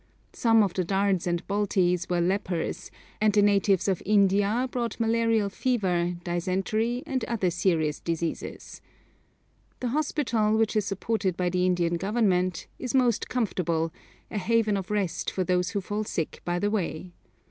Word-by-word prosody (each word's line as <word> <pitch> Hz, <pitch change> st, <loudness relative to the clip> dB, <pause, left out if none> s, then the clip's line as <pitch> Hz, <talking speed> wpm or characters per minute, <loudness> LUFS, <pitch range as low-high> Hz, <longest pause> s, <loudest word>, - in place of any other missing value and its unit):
Some 225 Hz, -2 st, +4 dB
of 195 Hz, -3 st, -1 dB
the 185 Hz, -, 0 dB
Dards 195 Hz, 0 st, +1 dB
and 175 Hz, 0 st, -1 dB
Baltis 190 Hz, -3 st, +1 dB
were 175 Hz, -1 st, +1 dB
lepers, 180 Hz, -2 st, -2 dB, 0.3 s
and 215 Hz, 0 st, +4 dB
the 205 Hz, -1 st, +4 dB
natives 200 Hz, -2 st, +3 dB
of 190 Hz, -3 st, 0 dB
India 205 Hz, +4 st, +3 dB
brought 240 Hz, -2 st, -3 dB
malarial 225 Hz, -2 st, +2 dB
fever, 185 Hz, -7 st, 0 dB
dysentery, 195 Hz, -, -1 dB
and 265 Hz, -5 st, -2 dB
other 200 Hz, -7 st, 0 dB
serious 165 Hz, -4 st, 0 dB
diseases. 165 Hz, -1 st, -4 dB, 1.0 s
The 250 Hz, -, -2 dB
hospital, 235 Hz, -6 st, +1 dB
which 220 Hz, -1 st, +1 dB
is 210 Hz, -2 st, +1 dB
supported 195 Hz, -2 st, -1 dB
by 180 Hz, -1 st, +1 dB
the 180 Hz, +1 st, +1 dB
Indian 175 Hz, -1 st, +1 dB
Government, 185 Hz, -3 st, 0 dB
is 255 Hz, 0 st, -3 dB
most 245 Hz, -4 st, +2 dB
comfortable, 170 Hz, -9 st, -1 dB, 0.4 s
a 210 Hz, -, -2 dB
haven 225 Hz, 0 st, +2 dB
of 190 Hz, -2 st, -4 dB
rest 205 Hz, -5 st, -1 dB
for 185 Hz, -, -1 dB
those 180 Hz, 0 st, +1 dB
who 200 Hz, 0 st, -2 dB
fall 205 Hz, +3 st, -3 dB
sick 165 Hz, -6 st, -4 dB
by 175 Hz, 0 st, -1 dB
the 205 Hz, +3 st, 0 dB
way. 180 Hz, -4 st, -3 dB
195 Hz, 155 wpm, -27 LUFS, 180-220 Hz, 1.0 s, Some